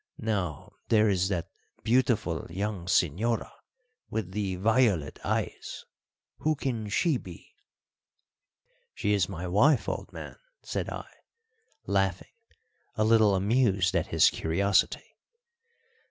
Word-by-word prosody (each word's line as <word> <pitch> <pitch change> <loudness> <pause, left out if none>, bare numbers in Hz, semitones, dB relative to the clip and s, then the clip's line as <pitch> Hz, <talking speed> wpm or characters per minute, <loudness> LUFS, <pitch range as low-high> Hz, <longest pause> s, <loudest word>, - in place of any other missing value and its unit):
Now, 90 -7 -3 0.2
there 110 -2 +4
is 95 -2 +2
that 90 -4 -3 0.3
beautiful 115 -8 +1
young 95 -1 -3
señora 95 +7 +1 0.6
with 105 -4 -3
the 95 -2 -2
violet 100 - +2
eyes, - - -3 0.5
who 155 0 0
can 115 -7 -3
she 155 - +2
be?" 90 -7 -12 1.4
"She 105 - 0
is 100 -3 +1
my 90 -2 -5
wife, 115 - +3
old - - -4
man," - - -9 0.3
said - - -3
I, - - -6 0.8
laughing, 95 -2 -1 0.6
a 110 - +1
little 110 -2 +5
amused 100 -2 +2
at - - +1
his - - +4
curiosity. 95 +4 +1
100 Hz, 110 wpm, -28 LUFS, 90-110 Hz, 1.4 s, little